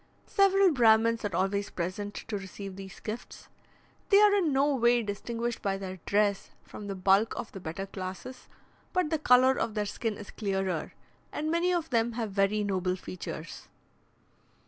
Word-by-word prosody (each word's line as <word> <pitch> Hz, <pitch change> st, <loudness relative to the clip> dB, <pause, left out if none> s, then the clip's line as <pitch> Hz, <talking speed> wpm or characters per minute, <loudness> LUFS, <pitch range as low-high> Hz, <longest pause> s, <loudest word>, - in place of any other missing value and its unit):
Several 390 Hz, -2 st, +4 dB
Brahmins 230 Hz, -3 st, +4 dB
are 200 Hz, -4 st, -2 dB
always 200 Hz, +2 st, 0 dB
present 185 Hz, +4 st, -4 dB
to 220 Hz, -, -5 dB
receive 195 Hz, 0 st, -8 dB
these 195 Hz, 0 st, -10 dB
gifts. 225 Hz, +3 st, -7 dB, 0.6 s
They 400 Hz, -2 st, +7 dB
are 415 Hz, -1 st, +6 dB
in 370 Hz, -7 st, +2 dB
no 280 Hz, +2 st, +3 dB
way 240 Hz, -2 st, +3 dB
distinguished 230 Hz, +3 st, -3 dB
by 195 Hz, -1 st, -1 dB
their 190 Hz, -1 st, -6 dB
dress 205 Hz, -1 st, +1 dB
from 205 Hz, -, -9 dB
the 195 Hz, -, -4 dB
bulk 195 Hz, +4 st, +3 dB
of -, -, -5 dB
the 195 Hz, -, -8 dB
better 175 Hz, +2 st, -5 dB
classes, 190 Hz, +6 st, -7 dB, 0.5 s
but 365 Hz, -5 st, +1 dB
the 320 Hz, -, +1 dB
colour 255 Hz, -1 st, +5 dB
of 220 Hz, -, -2 dB
their 210 Hz, -1 st, 0 dB
skin 215 Hz, +1 st, -3 dB
is 205 Hz, -, -9 dB
clearer, 190 Hz, -6 st, -2 dB, 0.4 s
and 310 Hz, +1 st, -2 dB
many 340 Hz, +2 st, +2 dB
of 335 Hz, -4 st, -1 dB
them 230 Hz, 0 st, +1 dB
have 225 Hz, -3 st, -3 dB
very 200 Hz, +2 st, +1 dB
noble 185 Hz, -2 st, 0 dB
features. 170 Hz, -3 st, -8 dB
210 Hz, 170 wpm, -29 LUFS, 195-250 Hz, 0.6 s, They